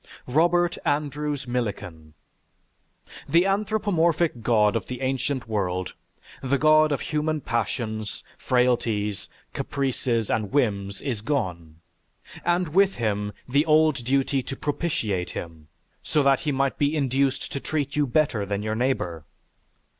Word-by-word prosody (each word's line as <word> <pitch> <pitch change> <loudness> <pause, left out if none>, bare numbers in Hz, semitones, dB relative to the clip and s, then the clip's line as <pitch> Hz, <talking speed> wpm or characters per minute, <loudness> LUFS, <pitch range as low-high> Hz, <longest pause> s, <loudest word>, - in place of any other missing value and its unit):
ROBERT 175 +5 +2
ANDREWS 145 -1 -1
MILLIKAN 90 -10 -4 1.1
The 170 +2 +4
anthropomorphic 190 - +1
God 105 -2 +3
of 115 - -2
the 125 -1 -5
ancient 130 -1 -1
world 95 -4 -2 0.5
the 135 +1 +1
God 155 +1 +5
of 145 - -1
human 155 0 -1
passions, 110 -3 -3
frailties, 115 -5 0 0.2
caprices, 125 -5 -1
and 110 -3 -1
whims 100 -8 0
is 120 -7 -3
gone, 85 - -3 0.6
and 175 -1 +1
with 195 +4 +3
him 105 -3 -1 0.2
the 140 +3 +3
old 155 -4 +4
duty 135 +2 +1
to 135 - -6
propitiate 115 - -2
him, 80 -2 -8 0.3
so 150 - +1
that 135 -1 +4
he 155 -3 -1
might 135 0 0
be 145 +2 +2
induced 135 -1 0
to 140 - -3
treat 145 -1 -2
you 145 -1 +2
better 120 -5 +1
than 100 +1 -3
your 110 0 -1
neighbor. 110 - -1
130 Hz, 130 wpm, -25 LUFS, 105-150 Hz, 1.1 s, God